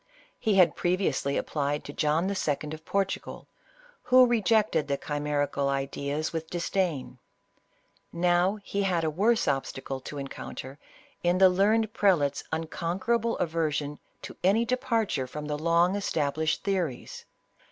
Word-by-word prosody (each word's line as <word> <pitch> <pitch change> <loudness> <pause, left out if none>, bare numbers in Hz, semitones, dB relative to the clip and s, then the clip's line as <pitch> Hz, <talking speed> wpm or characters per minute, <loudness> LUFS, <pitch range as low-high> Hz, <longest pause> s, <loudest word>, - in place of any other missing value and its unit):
He 220 -4 +1
had 185 -3 +5
pre 175 +1 +1
viously 140 -6 0
applied 145 0 -2
to 145 - -8
John 155 +5 +1
II. 150 -6 -1
of 155 0 -9
Portugal, 195 -1 -2 0.5
who 255 0 +6
rejected 220 -8 +2
the 140 -1 0
chimerical 145 -1 -1
ideas 140 +3 -2
with 160 0 -4
disdain; 175 -4 -2 0.9
now 175 +3 +2
he 200 - -2
had 180 -4 +1
a 160 - 0
worse 215 +8 +2
obstacle 135 -1 -2
to 145 +2 -8
encounter 135 0 -7 0.4
in 175 +1 +2
the 190 0 +7
learned 210 +4 +2
prelate's 155 -9 +2
uncon 165 +2 -3
querable 235 +2 0
aversion 150 -3 -1 0.2
to - - -8
any 205 +6 +3
departure 230 - 0
from 150 +3 -6
the 150 0 -2
long 170 +4 +2
established 155 -5 -1
theories. 185 -10 -3
165 Hz, 135 wpm, -28 LUFS, 145-195 Hz, 0.9 s, the